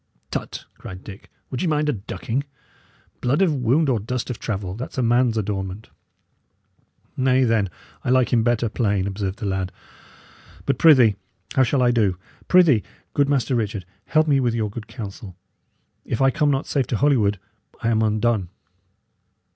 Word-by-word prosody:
"Tut!" - - -5
cried 95 0 -9
Dick. 100 -1 -11 0.2
"Would 130 - -3
ye 185 - 0
mind 150 -1 +1
a 150 - +2
ducking? 115 +5 -3 0.8
Blood 140 +10 +2
of 170 -5 +2
wound 135 +4 +2
or 125 -5 +2
dust 125 +4 -3
of 115 - -6
travel 95 -4 -3
that's 120 +7 -7
a 130 - +1
man's 120 0 +3
adornment." 100 0 -4 1.2
"Nay, 130 0 +3
then, 115 -5 +2 0.3
I - - -2
like 130 -2 +3
him 115 - +4
better 120 0 +1
plain," 105 -4 0
observed 100 -1 -3
the 110 - -5
lad. 95 -1 -2 0.9
"But, - - 0
prithee, 125 - +6 0.4
how 130 - +3
shall 130 +1 +2
I 120 - +4
do? 105 -7 +1 0.3
Prithee, 170 - +5 0.3
good 140 -1 +2
Master 135 -2 +1
Richard, 105 -5 -1 0.2
help 155 +6 +2
me 140 -2 +4
with 120 -3 +1
your 110 -3 -1
good 105 +1 -8
counsel. 100 -4 -8 0.7
If 115 - -3
I 135 0 +4
come 150 +3 +1
not 135 0 0
safe 140 -3 0
to 115 - -1
Holywood, 115 -8 +3 0.5
I 115 - +2
am 110 -1 +2
undone." 110 -3 +1
115 Hz, 170 wpm, -22 LUFS, 105-130 Hz, 1.2 s, prithee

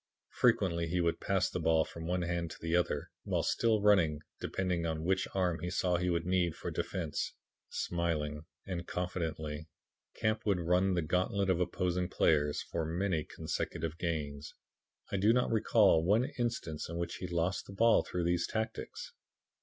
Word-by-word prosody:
Frequently 95 -8 +2
he 90 +2 0
would 85 -1 +1
pass 95 -1 +1
the - - -3
ball 80 -1 +3
from 80 -1 -7
one 90 0 0
hand 85 -1 -1
to - - -9
the 80 +1 0
other, 85 -5 0
while - - 0
still 110 -3 +2
running, 85 -8 +4 0.2
depending 90 -3 -1
upon 80 -1 -2
which 95 +2 +1
arm 90 -3 +1
he 90 +3 -3
saw 90 0 +1
he 90 +1 0
would 85 -1 0
need 90 -2 +1
for - - -5
defense. - - -3 0.3
Smilingly 75 -4 -1 0.2
and 85 -3 -4
confidently, 80 -4 -3 0.5
Camp 110 0 0
would 100 -4 +2
run 90 +2 +2
the 85 - +1
gauntlet 95 +4 +1
of 90 - +1
opposing 90 0 0
players 75 -5 +2
for 85 - -3
many 85 0 0
consecutive 80 +2 -4
gains. 75 -4 -3 0.6
I 100 - 0
do 105 +4 +4
not 125 0 +2
recall 105 -6 +4
one 105 +8 +3
instance 115 -12 -2
in 85 - -4
which 85 0 -3
he 90 - -5
lost 85 +2 -1
the - - -9
ball 115 +3 +5
through 90 - -3
these 85 0 +1
tactics. 430 - -4
90 Hz, 170 wpm, -33 LUFS, 80-95 Hz, 0.6 s, ball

